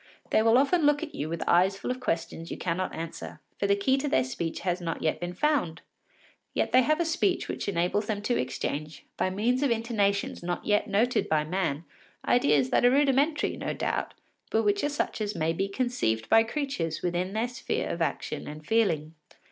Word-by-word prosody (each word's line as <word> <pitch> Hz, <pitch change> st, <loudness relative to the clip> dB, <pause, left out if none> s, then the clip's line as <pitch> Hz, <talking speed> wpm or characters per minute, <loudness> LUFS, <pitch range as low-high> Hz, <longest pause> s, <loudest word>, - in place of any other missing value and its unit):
They -, -, +4 dB
will 225 Hz, +2 st, +5 dB
often 285 Hz, +6 st, +3 dB
look 295 Hz, +1 st, +3 dB
at 315 Hz, -, -6 dB
you 150 Hz, -, -4 dB
with 165 Hz, 0 st, -3 dB
eyes 185 Hz, +3 st, +4 dB
full 225 Hz, -, -3 dB
of 255 Hz, -, -4 dB
questions 165 Hz, -7 st, -3 dB
you -, -, -5 dB
cannot 180 Hz, +1 st, -2 dB
answer, 85 Hz, -, -7 dB, 0.2 s
for 200 Hz, -, +1 dB
the 200 Hz, -, +4 dB
key 260 Hz, +7 st, +2 dB
to 290 Hz, -, -2 dB
their 130 Hz, -, +3 dB
speech 160 Hz, +5 st, -4 dB
has 180 Hz, 0 st, -1 dB
not 165 Hz, -2 st, -3 dB
yet 155 Hz, -, 0 dB
been 175 Hz, 0 st, -5 dB
found. 220 Hz, -, 0 dB, 0.7 s
Yet -, -, 0 dB
they 255 Hz, -, +6 dB
have 310 Hz, +5 st, +2 dB
a 340 Hz, -, +1 dB
speech 350 Hz, +3 st, 0 dB
which -, -, -3 dB
enables 190 Hz, +3 st, 0 dB
them 210 Hz, -2 st, -2 dB
to 240 Hz, +3 st, +1 dB
exchange, 150 Hz, +4 st, -3 dB
by -, -, 0 dB
means 230 Hz, +7 st, 0 dB
of 285 Hz, -, +2 dB
intonations 220 Hz, -4 st, 0 dB
not 175 Hz, 0 st, -3 dB
yet 210 Hz, -1 st, +2 dB
noted 230 Hz, +5 st, +1 dB
by 155 Hz, -1 st, +2 dB
man, 165 Hz, -2 st, -2 dB, 0.4 s
ideas 145 Hz, -, +3 dB
that -, -, +3 dB
are 245 Hz, -, +7 dB
rudimentary, 285 Hz, +3 st, +2 dB
no -, -, -3 dB
doubt, -, -, -2 dB, 0.3 s
but 225 Hz, -, +1 dB
which 205 Hz, -1 st, +1 dB
are 290 Hz, -, +2 dB
such 290 Hz, -5 st, -2 dB
as 210 Hz, 0 st, -2 dB
may 160 Hz, 0 st, 0 dB
be 195 Hz, +4 st, -1 dB
conceived 195 Hz, -, -1 dB
by 225 Hz, -, +7 dB
creatures 225 Hz, -, -3 dB
within 180 Hz, +2 st, -1 dB
their 220 Hz, +3 st, 0 dB
sphere 245 Hz, -1 st, -3 dB
of 170 Hz, -, -4 dB
action 155 Hz, -4 st, -2 dB
and 150 Hz, +1 st, -8 dB
feeling. 165 Hz, -9 st, +1 dB
200 Hz, 205 wpm, -28 LUFS, 165-250 Hz, 0.7 s, are